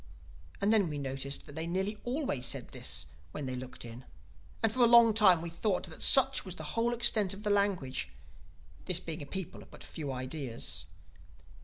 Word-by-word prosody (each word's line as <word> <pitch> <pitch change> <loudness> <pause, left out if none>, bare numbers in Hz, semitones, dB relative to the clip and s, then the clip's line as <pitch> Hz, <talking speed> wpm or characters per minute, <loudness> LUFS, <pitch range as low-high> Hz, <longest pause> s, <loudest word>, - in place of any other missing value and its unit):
"And 200 +2 +3
then 200 -6 +3
we 150 - -4
noticed 135 0 -4
that - - -11
they 160 +2 -3
nearly 190 +4 -2
always 245 - -1
said - - -2
this - - -1 0.3
when 145 - -4
they 130 -1 -3
looked 125 -1 -7
in. 120 +2 -9 0.6
And 225 - +3
for 255 - -5
a - - +7
long 235 -1 +7
time 190 -6 +5
we 170 - -5
thought 185 +3 0
that 165 -4 -8
such 270 0 +5
was 185 -3 -7
the 155 - -7
whole 230 +1 +1
extent 215 -5 +2
of 205 - -11
the 210 - +1
language, 180 - 0 0.7
this 180 -2 +1
being 165 -2 -6
a 145 - -7
people 190 +3 -5
of - - -15
but - - -12
few 145 -4 -5
ideas. 130 - -4
175 Hz, 195 wpm, -31 LUFS, 140-210 Hz, 0.7 s, a